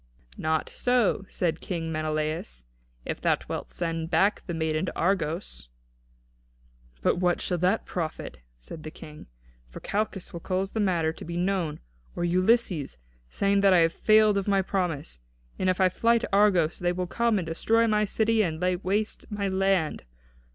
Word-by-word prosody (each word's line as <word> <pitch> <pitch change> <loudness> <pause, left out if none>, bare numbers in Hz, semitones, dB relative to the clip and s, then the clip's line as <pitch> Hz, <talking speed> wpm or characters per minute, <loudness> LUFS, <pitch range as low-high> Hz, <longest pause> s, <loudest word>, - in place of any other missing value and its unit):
"Not 160 0 -1
so," 245 -6 +1
said 165 -3 -1
King 165 -3 -4
Menelaus, 155 - -3 0.4
"if - - -4
thou - - +3
wilt - - -5
send 165 -1 -3
back 190 +5 +2
the 175 - -3
maiden 160 +2 -1
to - - -5
Argos." 170 - -1 1.3
"But - - +2
what 180 -1 +2
shall 180 -2 -2
that 185 +5 +1
profit," 155 - -5 0.2
said 110 - -9
the 155 - -7
King; 150 -1 -12 0.4
"for - - -9
Calchas 205 -2 -3
will 170 - -5
cause 190 +2 -2
the 220 - -3
matter 170 -6 +1
to - - -10
be 170 +1 -5
known; 180 -4 -1 0.3
or - - -2
Ulysses, 180 - +1 0.3
saying 200 - +1
that 195 -1 +5
I 180 - +6
have 165 - -2
failed 215 -1 +4
of 195 - -5
my 195 -1 +3
promise; 175 - -3 0.4
and 185 - +1
if 185 - 0
I 190 - +5
fly 230 +6 +2
to - - -4
Argos, 190 -6 +3
they 175 0 +1
will 180 0 -2
come 235 +4 +1
and 180 - -2
destroy 225 +8 +2
my 210 -1 +2
city 220 +2 +2
and 160 -6 -1
lay 180 0 +1
waste 200 +4 -2
my 205 -1 -2
land. 190 -4 +1
180 Hz, 170 wpm, -27 LUFS, 160-200 Hz, 1.3 s, I